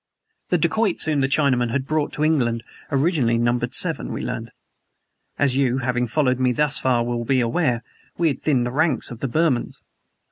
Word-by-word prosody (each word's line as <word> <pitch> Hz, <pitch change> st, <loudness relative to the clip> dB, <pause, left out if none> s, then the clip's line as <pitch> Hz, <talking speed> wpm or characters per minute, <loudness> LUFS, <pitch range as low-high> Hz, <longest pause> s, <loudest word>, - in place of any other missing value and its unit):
The -, -, +3 dB
dacoits 220 Hz, -5 st, +1 dB
whom 150 Hz, -3 st, +1 dB
the 135 Hz, -, +2 dB
Chinaman 135 Hz, -4 st, +1 dB
had 130 Hz, +2 st, -1 dB
brought 155 Hz, 0 st, -1 dB
to 150 Hz, -, -2 dB
England 120 Hz, -7 st, +1 dB, 0.3 s
originally 140 Hz, -5 st, +2 dB
numbered 120 Hz, +1 st, 0 dB
seven, -, -, 0 dB
we -, -, -4 dB
learned. -, -, -4 dB, 0.9 s
As 140 Hz, -3 st, +2 dB
you, 130 Hz, -2 st, +2 dB
having 125 Hz, -1 st, -1 dB
followed 130 Hz, 0 st, +1 dB
me 130 Hz, -1 st, +2 dB
thus 150 Hz, +2 st, +1 dB
far, 125 Hz, -2 st, +2 dB
will 120 Hz, 0 st, -2 dB
be 130 Hz, +2 st, +1 dB
aware, 120 Hz, 0 st, 0 dB, 0.3 s
we 170 Hz, -2 st, +2 dB
had 140 Hz, -, -4 dB
thinned 130 Hz, -6 st, +1 dB
the 120 Hz, -, -3 dB
ranks 150 Hz, -1 st, +1 dB
of 120 Hz, -, -8 dB
the 135 Hz, -, -2 dB
Burmans. 150 Hz, -2 st, 0 dB
130 Hz, 185 wpm, -22 LUFS, 120-150 Hz, 0.9 s, The